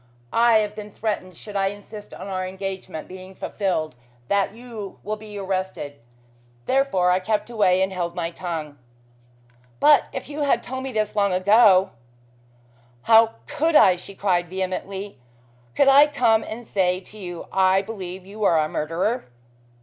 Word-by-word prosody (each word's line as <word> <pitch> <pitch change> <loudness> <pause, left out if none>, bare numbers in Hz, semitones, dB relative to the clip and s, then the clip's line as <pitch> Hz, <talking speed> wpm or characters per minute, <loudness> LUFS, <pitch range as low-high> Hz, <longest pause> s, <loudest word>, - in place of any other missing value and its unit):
I 230 -1 +5
have 210 -1 0
been 210 -1 -8
threatened 195 -6 -4
should 210 -1 -10
I 195 -1 +2
insist 205 +1 -8
on - - -8
our 185 -1 -3
engagement 190 -4 -6
being 185 +1 -11
fulfilled 185 -7 -2 0.4
that 200 -1 +2
you 225 -3 -9
will 215 +1 -2
be 210 -1 -10
arrested. 185 -7 -4 0.7
Therefore 260 -10 +2
I 180 - +3
kept 215 +4 -2
away 190 -5 +3
and 190 0 -2
held 175 -2 -3
my 170 -1 -2
tongue." 160 -5 -6 1.0
"But 300 -1 +6
if - - -6
you 295 +1 -5
had 285 - +2
told 260 +1 -5
me 265 0 -5
this 215 -2 -1
long 200 -2 +2
ago 195 0 +5 0.5
" 120 0 -33
"How 225 0 +5
could 320 +2 0
I?" 185 -10 +7
she 185 +2 -11
cried 180 -3 0
vehemently. 190 0 -4 0.6
"Could 280 - +4
I 280 +2 +8
come 240 -6 +2
and 230 +2 -7
say 185 -3 +1
to 215 +3 -14
you, 175 -3 -7
I 190 0 +3
believe 190 -3 -7
you 210 +2 -7
are 170 -5 +4
a 155 -1 +2
murderer?" 165 +11 -2
195 Hz, 165 wpm, -23 LUFS, 180-220 Hz, 1.0 s, I